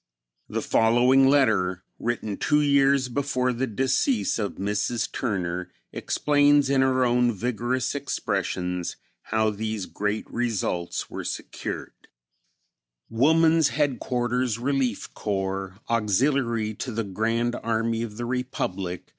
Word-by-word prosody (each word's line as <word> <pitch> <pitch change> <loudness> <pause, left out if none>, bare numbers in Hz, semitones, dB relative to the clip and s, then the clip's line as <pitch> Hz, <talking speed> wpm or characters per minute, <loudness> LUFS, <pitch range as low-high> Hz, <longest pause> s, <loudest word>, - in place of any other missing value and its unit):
The - - -2
following 125 +4 +4
letter 105 -10 +2 0.2
written 110 -3 -2
two 150 - +2
years 140 -2 +3
before 125 -1 0
the 130 +3 -1
decease 135 - +1
of 105 -2 -2
Mrs. 105 +4 -1
Turner 90 -6 -2 0.2
explains 145 -1 +3
in 135 -1 +4
her 130 -1 +3
own 120 0 +3
vigorous 120 +3 -1
expressions 95 -9 -2 0.3
how 110 -1 0
these 110 -1 -3
great 105 +3 -2
results 105 -7 -2
were - - -5
secured: - - -5 1.2
"Woman's 160 +6 +4
Headquarters 125 -4 0
Relief 130 -2 -1
Corps, 95 -2 -3
(Auxiliary 115 0 +1
to 125 +4 -5
the 115 0 -2
Grand 115 +4 -1
Army 115 0 -1
of 110 -2 -5
the 120 - -3
Republic.) 100 -8 -3
120 Hz, 115 wpm, -25 LUFS, 105-130 Hz, 1.2 s, following